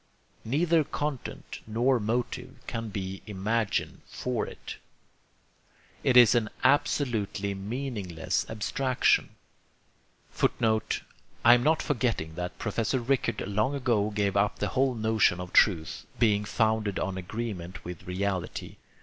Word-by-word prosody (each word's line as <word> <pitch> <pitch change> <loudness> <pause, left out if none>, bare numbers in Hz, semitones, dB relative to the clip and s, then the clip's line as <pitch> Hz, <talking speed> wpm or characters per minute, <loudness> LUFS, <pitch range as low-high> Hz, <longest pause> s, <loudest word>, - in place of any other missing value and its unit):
Neither 160 +6 +2
content 145 -2 -5
nor 120 +4 +2
motive 120 +4 -2
can 115 -2 -4
be 95 -1 -5
imagined 105 +2 -1
for 125 -3 -2
it. - - -8 1.3
It 125 - +4
is 120 -2 +8
an 115 -3 +1
absolutely 120 -8 +1
meaningless 100 -5 -3
abstraction. 125 +4 +1 1.0
[Footnote: 110 -1 0 0.4
I 120 - +10
am 120 - +4
not 155 +4 +2
forgetting 115 - -1
that 90 +2 -5
Professor 115 +4 -1
Rickert 120 -5 0
long 105 +7 0
ago 120 -6 +1
gave 100 -2 0
up 100 +1 +2
the 105 - -1
whole 130 +5 +1
notion 110 -5 +2
of 90 0 -7
truth 80 -7 +3
being 105 -3 +3
founded 110 -2 +1
on 95 0 -2
agreement 95 -2 -5
with 90 -1 -8
reality. 95 0 -3
110 Hz, 120 wpm, -28 LUFS, 100-125 Hz, 1.3 s, I